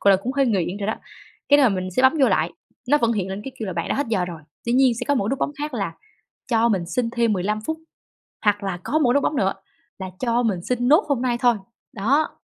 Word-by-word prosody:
gọi 200 - +5
là, 190 - +5
cũng 255 +5 -2
hơi 275 -1 +2
nghiện 195 -5 0
rồi 205 -1 -4
đó. 220 - 0 0.5
Cái 285 - +6
là 270 -3 +6
mình 185 -2 -2
sẽ 220 +8 0
bấm 260 - +6
vô 265 - +5
lại, 170 -3 +1 0.4
nó 295 +2 +5
vẫn 235 -2 +2
hiện 195 -4 -2
lên 190 +1 -5
cái 270 - -6
kêu 220 - -4
là 190 - -3
"Bạn 170 -1 -3
đã - - 0
hết 285 - -1
giờ 195 -5 +1
rồi", 170 -3 -7 0.2
tuy 235 - -1
nhiên 260 0 +5
sẽ 230 - -4
có 285 - +4
một 225 - 0
cái 210 - -1
nút 270 - -1
bấm - - 0
khác 295 -1 -4
là 195 -8 -3 0.5
cho 230 -1 +3
mình 190 -6 0
xin 230 +6 -1
thêm 235 -1 +1
15 210 +3 -1
phút, 315 0 -2 0.7
hoặc 205 -1 +2
là 190 -2 -3
có 310 - +1
một 290 -5 +2
cái - - +3
nút 285 - +3
bấm 300 - 0
nữa 195 -6 +2 0.5
là 190 -1 -6
cho 240 -1 +1
mình 200 -7 -1
xin 245 +4 -1
nốt 310 +9 +5
hôm 270 -4 0
nay 245 -2 0
thôi. 240 -2 +4 0.4
Đó, 270 +10 0
230 Hz, 285 wpm, -23 LUFS, 195-260 Hz, 0.7 s, Cái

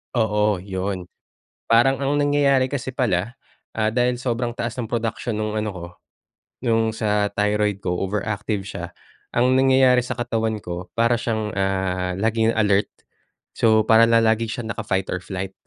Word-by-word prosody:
Oo, 105 -4 +1
yun. 95 -1 -4 0.5
Parang 120 +4 +4
ang 145 +2 +1
nangyayari 145 -2 +3
kasi 130 -1 -4
pala, 115 -3 -1 0.3
ah, 110 -1 0
dahil 125 +2 +1
sobrang 120 -1 -2
taas 120 0 -4
ng 125 - -3
production 115 0 -2
nung 110 0 -2
ano 110 0 -1
ko, 90 -3 -8 0.8
nung 115 -2 +2
sa 105 -2 +1
thyroid 105 -1 0
ko 90 - 0
overactive 105 +1 -2
siya, 100 - -6 0.5
ang 125 +2 +3
nangyayari 130 -1 +5
sa 125 +1 -5
katawan 115 -2 -1
ko, 90 +1 -6
para 115 +1 +2
siyang 110 -3 -2
ah, 95 -2 -1
laging 110 +2 +1
alert. 105 -2 +2 0.7
So 110 -1 +4
para 115 +1 +6
na 115 0 +5
lagi 110 +1 +2
siyang 115 0 -4
naka-fighter 95 -4 -2
flight. 95 0 -6
110 Hz, 150 wpm, -22 LUFS, 100-120 Hz, 0.8 s, para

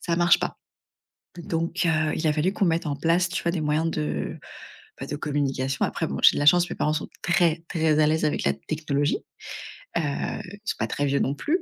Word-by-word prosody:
ça 170 - -1
marche 175 0 +5
pas. - - -3 0.8
Donc 170 +1 -2
heu, 155 -1 +2
il 160 - -2
a 150 - +3
fallu 155 +5 +1
qu'on 200 - +1
mette 165 -2 +1
en 145 - -1
place, 170 +4 +2
tu 185 - -3
vois? 170 - +1
Des 170 -2 -2
moyens 155 +2 +1
de, 75 - -3 0.6
bah - - -5
de - - -3
communication. 140 -3 -1
Après, - - -2
bon, - - -4
j'ai - - +8
de - - 0
la 145 - +1
chance, 175 +2 +6
mes - - -4
parents 150 - 0
sont 155 - -3 0.2
très, 170 -2 +2
très 160 -3 +2
à 150 - +5
l'aise 155 0 +1
avec 150 - 0
la 70 - +3
technologie, 145 - -1 0.8
heu, - - +2
ils 180 +7 -4
sont - - -1
pas - - 0
très 145 - -1
vieux 140 0 +1
non 135 - +1
plus. 330 - 0
155 Hz, 225 wpm, -25 LUFS, 145-170 Hz, 0.8 s, j'ai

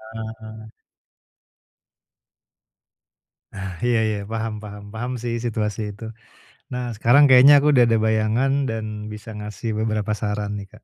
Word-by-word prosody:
Heeh. 110 0 -9 2.8
Ah, 95 -2 -6
iya 120 -2 +2
iya. 105 -1 -2
Paham 110 -1 -4
paham, 105 -1 -9
paham 125 +3 -4
sih 120 -1 -2
situasi 110 -1 -2
itu. 105 +3 -12 0.7
Nah 125 -1 -3
sekarang 120 +7 +5
kayaknya 130 +3 +8
aku 150 - +4
udah 125 -4 +5
ada 115 -1 +3
bayangan 110 +4 +1 0.2
dan 110 -1 -3 0.3
bisa 105 +2 -9
ngasih 105 +2 -6
beberapa 110 -1 -1
saran 105 -1 -3
nih 100 - -9
Kak. 110 - -19
110 Hz, 135 wpm, -22 LUFS, 105-120 Hz, 2.8 s, kayaknya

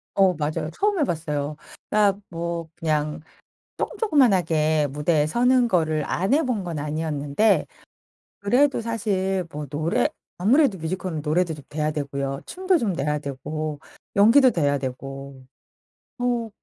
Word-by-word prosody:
어 190 -2 +5
맞아요. 155 0 -2
처음 410 -3 +1
해 - - +4
봤어요. 150 - -2 0.4
아 210 -2 +4 0.2
뭐 170 -1 -4
그냥 150 -1 -1 0.6
쪼끔 - - -3
쪼끄만하게 175 - +3
무대에 150 +1 +1
서는 245 +7 +3
거를 155 -6 +1
안 190 +8 0
해 310 - +3
본 240 -8 -1
건 170 -4 -4
아니었는데 150 +5 +1 0.7
그래도 250 +8 +3
사실 195 -5 -1
뭐 150 0 -6
노래 155 +4 0 0.3
아무래도 230 - +3
뮤지컬은 165 0 -3
노래도 165 +3 +1
좀 145 -2 -12
돼야 150 0 -1
되고요. 140 -2 -3
춤도 370 -1 +1
좀 215 - -1
돼야 150 +1 0
되고 150 +2 -5 0.4
연기도 245 +6 +7
돼야 145 -6 +1
되고. 135 0 -7 0.7
어 245 -2 -1
165 Hz, 280 characters per minute, -24 LUFS, 150-215 Hz, 0.7 s, 연기도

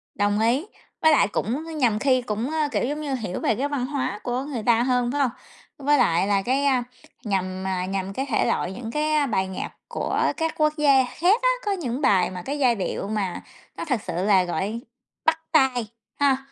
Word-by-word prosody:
Đồng 205 +1 +1
ý, 245 - +2 0.4
với 315 - +6
lại 290 - +4
cũng 305 +10 -3
nhằm 230 -6 +2
khi 255 -1 +3
cũng, 230 +3 -3
ơ, 310 -2 +1
kiểu - - 0
giống 295 +3 -3
như, 285 -3 -3
hiểu 210 -7 -4
về 225 - +1
cái 275 +6 -1
văn 280 -4 -2
hóa 260 -7 -2
của 250 +2 -2
người 260 -7 -5
ta 235 0 +3
hơn, 250 -1 +1
phải 285 +1 0
hông? 260 - +3 0.5
Với 290 +1 +3
lại 185 -6 +3
là 200 -1 +2
cái, 265 +6 0
a, 260 -3 +3 0.4
nhằm, 190 -2 -2
à, 185 -1 -1
nhằm 195 0 -3
cái 270 - -2
thể - - +2
loại, 180 - 0
những 230 +2 -6
cái, 305 +2 0
a, 300 -1 +3
bài 190 -7 0
nhạc 190 - -5 0.2
của - - -2 0.2
các 325 -1 -1
quốc 305 0 +3
gia 280 -3 +5
khác 365 - +2
á, - - +4 0.2
có 410 - +1
những 285 -8 -2
bài 190 -8 +3
mà 180 - -6
cái 285 +2 -3
giai 250 -3 +4
điệu 195 0 -3
mà 205 -4 -2 0.4
nó - - -4
thực 255 -9 -1
sự - - -5
là 195 -3 +4
gọi 200 +6 -2 0.5
bắt 320 0 +3
tai, 260 -7 +3 0.3
ha? 275 -2 +4
250 Hz, 220 wpm, -24 LUFS, 205-290 Hz, 0.5 s, với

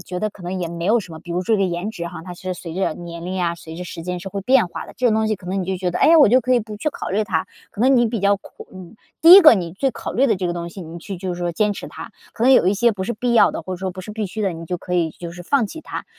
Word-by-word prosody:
觉 180 0 -6
得 215 - -1
可 195 - -15
能 185 +2 -4
也 170 - -2
没 170 0 -6
有 230 +3 +4
什 180 -5 -11
么， 160 - -8
比 175 - -11
如 180 +2 -1
说 220 +3 +2
这 195 - +1
颜 180 +3 -2
值 170 -5 -6
哈， 170 -2 -8
它 180 - -7
是 185 +1 -5
随 170 -2 -8
着 190 -4 -1
年 170 -1 -8
龄 185 +1 -3
啊， 170 -1 0
随 160 -1 -11
着 180 - -6
时 170 - -8
间 180 +1 -4
是 195 - -6
会 200 - -4
变 255 -3 +4
化 - - -7
的， - - -13
这 250 - +1
种 220 - +3
东 220 0 +1
西 215 - 0
可 180 - -15
能 190 +1 -1
你 180 - -4
就 190 - -1
觉 180 -1 -2
得： - - -3
“哎 300 - +5
呀， 330 0 +7
我 285 - +7
就 255 +3 +5
可 255 +1 +1
以 240 - +3
不 215 0 -8
去 220 - -1
考 - - -6
虑 210 +3 +1
它。” 170 -6 -1 0.2
可 225 - -9
能 265 +1 +5
你 240 -1 +4
比 225 0 -2
较 200 +1 +3
苦 - - -14
嗯， 185 +3 -12 0.2
第 335 +2 +9
一 395 - +11
个 305 -8 +8
你 170 -4 -3
最 265 +8 0
考 - - -6
虑 265 +3 +3
的 220 - +3
这 180 -1 -2
个 175 - -2
东 170 0 -5
西， 190 - -10
你 170 0 -8
去 190 +1 -7
就 185 -1 -3
是 - - -9
说 175 -1 -1
坚 210 +4 +1
持 - - -7
它。 - - -9 0.2
可 230 - -6
能 265 - +6
有 215 - +5
一 190 - +4
些 235 +3 +3
不 190 -2 -4
是 235 - -2
必 240 +3 -1
要 - - +6
的， - - -4
或 185 - -5
者 - - -7
说 190 0 -3
不 185 - -8
是 185 - -9
必 215 -1 -3
须 215 +4 -6
的， 190 -3 0
你 165 0 -8
就 180 +2 -3
可 180 - -8
以 165 -2 +1
就 170 +1 -9
是 175 +1 -10
放 250 +2 +1
弃 320 - -9
它。 - - -6
190 Hz, 395 characters per minute, -21 LUFS, 175-220 Hz, 0.2 s, 一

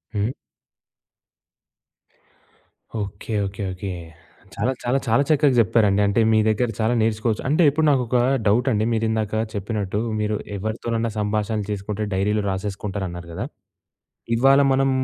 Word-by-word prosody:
హ్మ్. 105 +3 0 2.7
Okay, 100 +2 -5
okay, 100 +1 -5
okay. 95 +2 -6 0.7
చాలా, 120 +6 0
చాలా, 125 +3 +1
చాలా 115 +5 +3
చక్కగా 145 -3 +4
చెప్పారండి. 105 -2 +3
అంటే, 100 +3 +2
మీ 110 - +4
దగ్గర 110 +3 +1
చాలా 110 +2 +2
నేర్చుకోవచ్చు. 110 0 0
అంటే, 155 +4 +3
ఇప్పుడు 155 +2 +1
నాకొక 125 -3 +1 0.3
డౌటండి. 110 0 +2
మీరు 115 0 0
ఇందాక 110 -1 -1 0.2
చెప్పినట్టు, 105 -1 -2 0.2
మీరు 105 0 0 0.2
ఎవరితోనైనా 115 +2 -2
సంభాషణలు 105 0 -1
చేసుకుంటే 105 +1 -3
డైరీలో 105 +2 +1
రాసేసుకుంటారు 95 0 -3
అన్నారు 85 0 -8
కదా! - - -3 0.9
ఇవాళ 135 +3 +5
మనం 135 0 +2
110 Hz, 125 wpm, -22 LUFS, 100-120 Hz, 2.7 s, ఇవాళ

